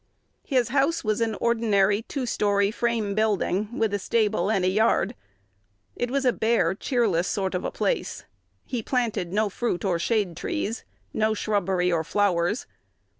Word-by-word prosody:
His 250 -5 +2
house 280 +6 +1
was 215 0 0
an 225 -2 0
ordinary 210 -3 +2
two 260 +3 -4
story 205 -3 +1
frame 225 -3 -1
building, 210 +1 0
with 220 -2 +1
a 205 - 0
stable 210 -2 +1
and 195 -4 +1
a - - +3
yard: 215 +5 +2 0.8
it 245 - -2
was 270 +1 0
a 250 - +4
bare, 220 -7 +2
cheerless 200 - 0
sort 190 -2 -1
of 180 - -2
a - - -1
place. - - -2 0.4
He 245 -3 -3
planted 225 -8 -1
no 210 +2 +2
fruit 205 -2 -2
or 175 -3 +1
shade 205 -3 0
trees, 245 - -3 0.3
no 220 0 +1
shrubbery 190 -4 0
or 165 -2 +1
flowers. 190 +3 +1
215 Hz, 160 wpm, -25 LUFS, 195-235 Hz, 0.8 s, a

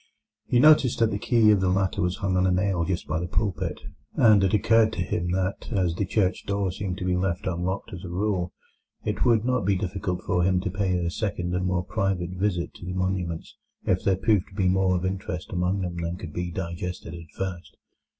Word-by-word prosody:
He 120 - +3
noticed 145 -3 +6
that 115 -1 +2
the 100 - -2
key 115 -2 +4
of 100 -2 +3
the 95 - +2
latter 95 0 +1
was 90 +1 0
hung 95 -2 -1
on 90 0 +3
a - - +2
nail 90 -1 +1
just 85 +1 -2
by 75 +2 -1
the 90 - -3
pulpit, 90 -4 -2 0.3
and 105 -4 +6
it 95 - +2
occurred 110 +1 +4
to 90 - -1
him 90 0 -2
that, 95 +5 -2
as 90 -6 +1
the 95 +2 -2
church 95 -2 0
door 100 -2 0
seemed 95 -1 -4
to 90 - -4
be 90 -1 +1
left 90 -1 -1
unlocked 95 +4 -2
as 90 0 -7
a 90 - -6
rule, 90 -1 -1 0.5
it - - -1
would 115 -2 +3
not 125 -1 +1
be 100 +1 +2
difficult 95 -1 -3
for 90 0 +1
him 90 +1 +3
to 95 -1 -2
pay 95 -2 0
a 85 -1 -1
second 90 -3 -2
and 90 0 0
more 90 -1 0
private 95 -4 -1
visit 90 -1 -1
to - - -11
the 90 - -3
monuments 90 -3 -2 0.3
if 95 -1 +1
there 95 - +3
proved 105 -2 +2
to 95 - -16
be 95 -2 +1
more 95 0 +3
of 90 +1 -1
interest 95 -1 -4
among 90 +2 0
them 90 -2 -4
than 85 +1 -3
could 85 -5 -8
be 90 +2 -3
digested 85 -1 -5
at 85 -2 -10
first. 90 -6 -5
95 Hz, 230 wpm, -26 LUFS, 90-100 Hz, 0.5 s, noticed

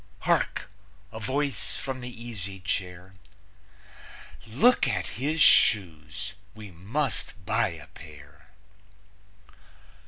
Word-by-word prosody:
(Hark! - - +1 0.4
A 110 - -7
voice 135 +3 -1
from 130 -2 -5
the 125 - -6
easy 110 -6 -7
chair: 90 -1 -4 1.3
"Look 155 - +4
at - - -1 0.2
his 155 +4 0
shoes! 95 0 +4 0.2
We 105 -3 -10
must 100 - -3
buy - - +2
a - - -8
pair.") 75 +1 -15
100 Hz, 95 wpm, -27 LUFS, 90-125 Hz, 1.3 s, Look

